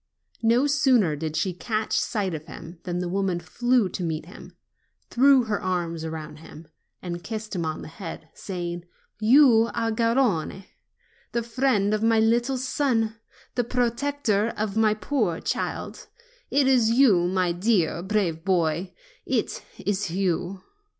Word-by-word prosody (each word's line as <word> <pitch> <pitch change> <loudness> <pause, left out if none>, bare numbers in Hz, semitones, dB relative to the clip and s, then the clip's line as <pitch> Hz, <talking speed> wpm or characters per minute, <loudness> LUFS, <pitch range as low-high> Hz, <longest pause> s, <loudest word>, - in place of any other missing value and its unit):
No 235 +4 +3
sooner 255 - +3
did 155 +1 -4
she 180 +3 0
catch 215 +4 -1
sight 200 -5 -1
of 155 0 -6
him 165 +1 -10
than 175 -1 -2
the 180 0 -2
woman 185 -1 -1
flew 240 +3 +1
to 185 - -5
meet 160 -2 -3
him, 180 - -13 0.6
threw 265 +1 +5
her 215 -3 -2
arms 170 -3 -2
around 160 -1 -6
him, 160 0 -13 0.4
and 175 -1 -5
kissed 220 -2 -5
him 170 -3 -1
on 155 - -4
the - - -8
head, 165 -1 -8
saying: 175 -2 -5 0.3
"You 230 0 +6
are 230 -1 0
Garrone, 230 -6 0 0.7
the 235 - 0
friend 230 -4 +1
of 215 - 0
my 225 0 +3
little 235 +4 +2
son, 245 -4 0 0.4
the 245 - 0
protector 235 -2 0
of 210 -1 -2
my 220 -1 +3
poor 215 - -1
child; - - -4 0.4
it 280 -1 +3
is 250 -4 +4
you, 225 -8 +4
my 185 -1 +1
dear, 175 -2 +1
brave 185 -5 -1
boy; 175 -1 0 0.3
it - - -1
is 205 -2 -2
you!" 185 +1 -2
205 Hz, 150 wpm, -25 LUFS, 175-235 Hz, 0.7 s, You